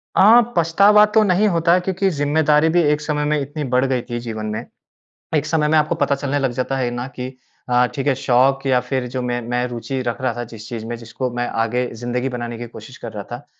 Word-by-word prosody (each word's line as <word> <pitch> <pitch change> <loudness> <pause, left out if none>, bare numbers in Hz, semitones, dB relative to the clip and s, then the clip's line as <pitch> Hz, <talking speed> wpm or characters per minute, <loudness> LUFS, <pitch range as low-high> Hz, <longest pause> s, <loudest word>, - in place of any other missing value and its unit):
अ, 225 +5 +7 0.2
पछतावा 200 +6 +5
तो 220 - +6
नहीं 200 +2 +3
होता 170 -1 +3
क्योंकि, 190 +1 0
ज़िम्मेदारी 150 0 +2
भी 175 +2 +3
एक 150 -1 +2
समय 150 -1 -1
में 150 0 +1
इतनी 145 +2 -4
बढ़ 130 +2 +3
गई 130 -2 0
थी 120 0 -3
जीवन 110 -2 -5
में। 110 +2 -4 0.7
एक - - 0
समय 150 -2 +1
में 160 - +3
आपको 150 +2 +1
पता 160 -3 +1
चलने 140 +1 -2
लग 135 -2 0
जाता 130 +2 -2
है 125 -2 -1
ना 120 +1 -4
कि 130 +1 -6 0.3
अ, 125 0 +4
ठीक 135 -1 -3
है 140 - +3
शौक़ 135 +1 +2
या 130 -1 +4
फिर 130 -2 -1
जो 130 +1 -4
मैं 120 0 -2
मैं 125 0 0
रूचि 125 +2 -4
रख 120 +2 -2
रहा 130 -2 0
था 120 - -3
जिस 110 -1 -11
चीज़ 115 -2 -6
में 120 - -4
जिसको 115 +2 -5
मैं 120 0 -1 0.2
आगे 125 +2 -1
ज़िंदगी 125 +2 -2
बनाने 120 -2 -5
की 120 - -6
कोशिश 115 +3 -12
कर 115 - -6
रहा 105 -2 -5
था। 120 +4 -7
130 Hz, 240 wpm, -20 LUFS, 120-150 Hz, 0.7 s, अ